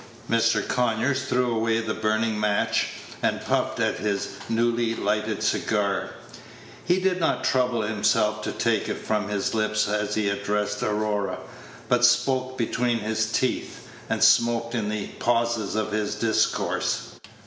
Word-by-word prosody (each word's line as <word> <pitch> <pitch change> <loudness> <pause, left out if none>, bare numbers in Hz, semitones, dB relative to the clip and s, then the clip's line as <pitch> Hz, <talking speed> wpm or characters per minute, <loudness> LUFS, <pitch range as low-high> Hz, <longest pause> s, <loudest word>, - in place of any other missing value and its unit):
Mr. 115 0 +2
Conyers 125 +2 0
threw 125 -2 +1
away 115 0 +1
the 115 -1 -2
burning 110 0 0
match, 105 -1 +1 0.3
and - - +1
puffed - - 0
at - - +1
his 100 -2 -1 0.2
newly 115 0 +1
lighted - - -1
cigar. 100 -2 0 0.7
He 180 +2 +2
did 185 -1 +1
not 165 - 0
trouble 125 -3 +1
himself 105 0 +1
to - - -2
take 115 -2 0
it - - -2
from 105 -1 -2
his 100 -1 -1
lips 110 -1 +1
as 105 0 -1
he 105 -1 0
addressed 105 +1 -1
Aurora, 105 -1 -1 0.5
but 120 0 +2
spoke 130 +1 +2
between 120 0 0
his 110 0 -1
teeth, 130 +3 -2 0.2
and - - +1
smoked 115 0 +4
in 110 -4 -1
the 105 -1 -2
pauses 115 -3 0
of 110 0 -1
his 105 0 -1
discourse. 110 +1 0
110 Hz, 145 wpm, -25 LUFS, 105-120 Hz, 0.7 s, smoked